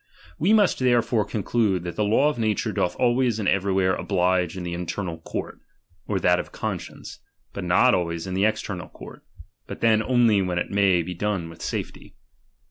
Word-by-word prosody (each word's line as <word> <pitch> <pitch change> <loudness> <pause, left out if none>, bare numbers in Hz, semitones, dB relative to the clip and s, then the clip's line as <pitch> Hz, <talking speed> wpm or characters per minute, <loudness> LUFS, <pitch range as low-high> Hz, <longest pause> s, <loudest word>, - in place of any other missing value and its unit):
We 185 +7 +2
must 215 -3 +4
therefore 120 -3 +2
conclude, 105 -3 0
that 85 -1 -5
the 105 - 0
law 110 +8 +3
of 150 -5 -1
nature 110 -3 0
doth 90 0 -1
always 120 -2 +1
and 105 -3 -2
everywhere 95 -1 +2
oblige 90 -2 0
in 90 - -5
the 85 0 -4
internal 85 0 -4
court, - - -6 0.5
or 100 -2 0
that 90 0 +3
of - - -6
conscience; - - -6 0.3
but 100 - -5
not 95 +9 +4
always 85 -1 -1
in 95 - -5
the 95 +2 +2
external 100 -4 -3
court, - - -12 0.4
but - - -8
then 110 -2 +4
only 115 -3 +3
when 90 -2 -2
it 90 - -2
may 95 -3 +3
be 90 +2 -5
done 95 -2 -2
with 85 - -14
safety. - - -5
100 Hz, 185 wpm, -24 LUFS, 90-115 Hz, 0.5 s, must